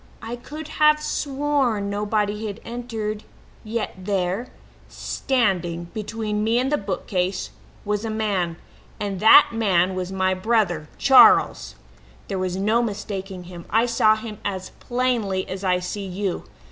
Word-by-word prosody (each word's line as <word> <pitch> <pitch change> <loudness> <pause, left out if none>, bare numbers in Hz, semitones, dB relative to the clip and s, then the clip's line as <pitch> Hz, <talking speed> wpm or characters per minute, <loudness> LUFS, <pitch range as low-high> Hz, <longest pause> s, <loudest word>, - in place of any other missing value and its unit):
I 230 +2 -4
could 300 +6 -9
have 300 0 +6
sworn 275 -8 -1
nobody 210 +1 -1
had 205 +1 -6
entered, 225 -3 -4 0.4
yet 220 +1 -3
there, 190 +3 -2 0.4
standing 175 -9 -1
between 215 -1 -3
me 225 +2 +2
and 260 +3 +1
the 295 - +3
bookcase, 185 -2 -2 0.3
was 210 +1 -1
a 225 - -3
man 200 -6 -1 0.4
and 200 -2 -3
that 220 +8 +8
man 190 -5 +2
was 185 0 -4
my 190 0 +1
brother 185 -6 0
Charles! 265 -1 +5 0.5
"There 195 -2 -2
was 185 -1 -2
no 215 +4 +2
mistaking 195 -4 -5
him; 175 -1 -10
I 225 +2 +3
saw 225 -2 +4
him 215 -1 -8
as 190 -2 -4
plainly 240 -7 -1
as 190 +1 -6
I 180 -1 +2
see 195 +2 -5
you. 190 0 -3
210 Hz, 140 wpm, -23 LUFS, 185-230 Hz, 0.5 s, that